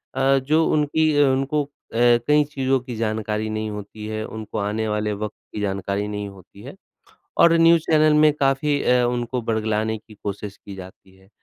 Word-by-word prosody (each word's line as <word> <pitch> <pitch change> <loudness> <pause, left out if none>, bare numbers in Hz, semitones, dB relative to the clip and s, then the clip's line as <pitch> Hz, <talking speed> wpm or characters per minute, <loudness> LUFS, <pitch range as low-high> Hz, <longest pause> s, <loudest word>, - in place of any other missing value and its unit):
अ, 135 +1 +3
जो 155 +5 +2
उनकी 155 +1 +2 0.2
उनको 135 +2 +1
अ, - - -13 0.6
कई 150 0 +5
चीज़ों 135 -2 -1
की 125 -1 -8
जानकारी 110 -1 -2
नहीं 110 0 -3
होती 105 +1 -8
है, 110 0 -4
उनको 110 0 -7
आने 105 +2 -1
वाले 105 0 -1
वक़्त 105 +1 -5 0.2
की 105 - -4
जानकारी 100 0 -2
नहीं 105 -1 -4
होती 100 0 -16
है 135 - -10 0.6
और 170 - +6
न्यूज़ 165 0 +5
चैनल 155 -1 +5
में 155 0 +6
काफ़ी 140 0 +1
अ, 125 0 +3
उनको 120 +1 -2
बर्गलाने 110 -1 -1
की 110 +1 -17
कोशिश 100 0 -5
की 100 - -11
जाती 95 0 -13
है। 95 0 -23
110 Hz, 180 wpm, -22 LUFS, 105-135 Hz, 0.6 s, और